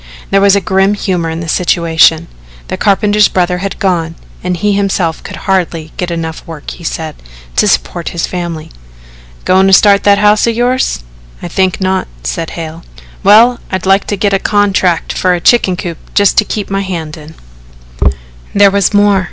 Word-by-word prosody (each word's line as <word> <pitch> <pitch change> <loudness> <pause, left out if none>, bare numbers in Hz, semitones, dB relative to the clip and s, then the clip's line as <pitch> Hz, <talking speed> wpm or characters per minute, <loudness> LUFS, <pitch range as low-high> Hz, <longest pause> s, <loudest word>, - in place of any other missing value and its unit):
There 195 - +3
was 200 0 +4
grim 195 +1 +1
humour 180 -5 -2
in 160 +1 -4
the 170 - -6
situation. 165 -1 +2 0.4
The - - -2
carpenter's 205 +1 +3
brother 180 -1 -1
had 195 +1 -4
gone 170 -5 -1 0.3
and 180 0 -2
he 205 +4 0
himself 190 -5 -1
could - - -8
hardly 170 -5 -1
get 180 - -3
enough 165 -1 -5
work, 160 -3 -8
he - - -11
said, 160 -1 -5 0.4
to - - +3
support - - -1
his 170 - -2
family. 170 -3 -5 0.7
"Goin' 190 +1 +3
to 195 - +3
start 200 +1 +5
that 200 0 +5
house 210 +2 +3
of 230 - 0
yours?" 245 - 0 0.4
"I - - -4
think 185 +1 0
not," 190 0 -1 0.2
said 160 - -4
Hale. 165 0 -7 0.4
"Well, 225 +5 +5
I'd 190 -1 -3
like 195 +1 +2
to 205 - -2
get 200 0 0
a 195 - +2
contract 195 -5 +1
for 180 -1 +1
a - - -3
chicken 185 -1 +3
coop 175 -4 -6 0.2
just 205 -1 +3
to 215 - +1
keep 205 -1 -4
my 195 0 0
hand 170 -5 -5
in." 155 0 -13 1.2
There 200 -1 +5
was 200 +1 +1
more. 205 -1 +4
190 Hz, 180 wpm, -12 LUFS, 165-200 Hz, 1.2 s, start